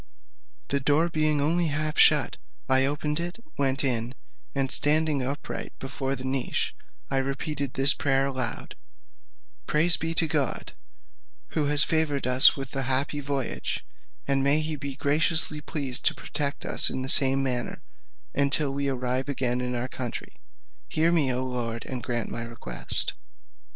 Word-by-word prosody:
The 140 - 0
door 150 +5 +1
being 155 -2 +1
only 165 +4 +1
half 155 +1 -3
shut, 150 -4 +4 0.3
I 130 0 +4
opened 150 +2 -2
it, 175 +3 -5 0.2
went 135 0 0
in, 120 -1 -2 0.4
and 135 -1 0
standing 150 -1 +6
upright 135 +3 -6
before 135 0 -4
the 130 - -9
niche, 130 -1 -2 0.4
I 135 - 0
repeated 140 +1 -4
this 135 +1 +5
prayer 135 -1 0
aloud: 130 -3 -4 0.9
"Praise 165 +3 +2
be 165 0 -3
to 165 - +4
God, 150 -3 -2 0.8
who 155 -2 -1
has 145 0 +7
favoured 155 -4 -1
us 125 +3 +7
with 135 0 -7
a 135 - -1
happy 135 +3 -1
voyage, 135 - -4 0.4
and 135 -1 +1
may 140 +3 +2
he 155 0 -3
be 140 -1 -6
graciously 150 +1 +1
pleased 140 -5 -3
to - - +2
protect 145 -2 -4
us - - +5
in 130 - -4
the - - -5
same 135 0 +6
manner, 125 -2 -3 0.5
until 140 0 +1
we 140 0 -2
arrive 130 +1 -2
again 125 -3 -1
in 125 0 -2
our 120 - -2
own - - -4
country. 125 -2 -6 0.6
Hear 160 +2 +1
me, 150 -6 +2
O 125 +1 -2
Lord, 120 -3 -5
and 130 -2 -5
grant 120 -1 -3
my 115 - -5
request." 115 0 -3
140 Hz, 160 wpm, -25 LUFS, 130-150 Hz, 0.9 s, has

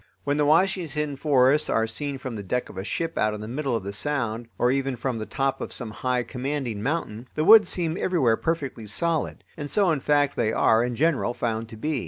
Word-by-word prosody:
When 145 +1 0
the 150 -1 +2
Washington 155 -3 +1
forests 135 0 +3
are 110 - +2
seen 140 +5 -4
from 130 -3 -6
the 105 - -5
deck 125 +6 -2
of - - -11
a - - -4
ship 165 +9 -3
out 110 0 +1
in 105 - -7
the 110 - -6
middle 135 +1 -2
of 110 - -2
the 100 +1 -5
sound, 115 -2 -2
or 125 - +3
even 135 -1 0
from 120 0 -3
the 110 - -5
top 135 0 -1
of - - -5
some 120 -4 -5
high, 125 +2 -1
commanding 130 -4 -3
mountain, 125 -4 -3
the 155 - 0
woods 220 +1 +8
seem 165 -3 -1
everywhere 150 -13 +2
perfectly 140 -7 -3
solid. 165 - -1
And 145 -2 -6
so 195 -1 +3
in 155 - 0
fact 145 0 +2
they 110 -2 +1
are 110 +1 +4
in 120 0 -2
general 140 -4 +1
found 115 -2 -2
to 110 - -10
be. 150 +4 -1
135 Hz, 230 wpm, -25 LUFS, 115-150 Hz, -, woods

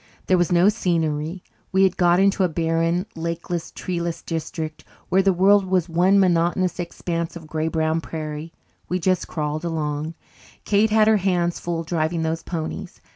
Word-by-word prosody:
There 185 - +3
was 175 - +1
no 175 +2 +5
scenery. 165 -4 0 0.3
We 190 0 +4
had 190 -1 +3
got 175 0 +4
into 195 0 +3
a 180 - +2
barren, 165 +2 0
lakeless, 170 +1 -4
treeless 170 -2 -4
district 160 -1 -5 0.3
where 190 - +4
the 195 0 +3
world 195 +3 +5
was 185 -2 +1
one 180 +4 +3
monotonous 175 0 +2
expanse 170 -1 -3
of 165 -2 -9
grey 155 0 -2
brown 160 0 0
prairie. 155 0 -6 0.4
We 180 - +1
just 185 0 0
crawled 155 0 -3
along. 155 -1 -3 0.5
Kate 210 +1 +3
had 215 0 +4
her 220 -1 +5
hands 175 -3 0
full 170 -1 -3
driving 165 0 -1
those 160 +1 -1
ponies. 160 -2 -5
170 Hz, 165 wpm, -23 LUFS, 160-185 Hz, 0.5 s, no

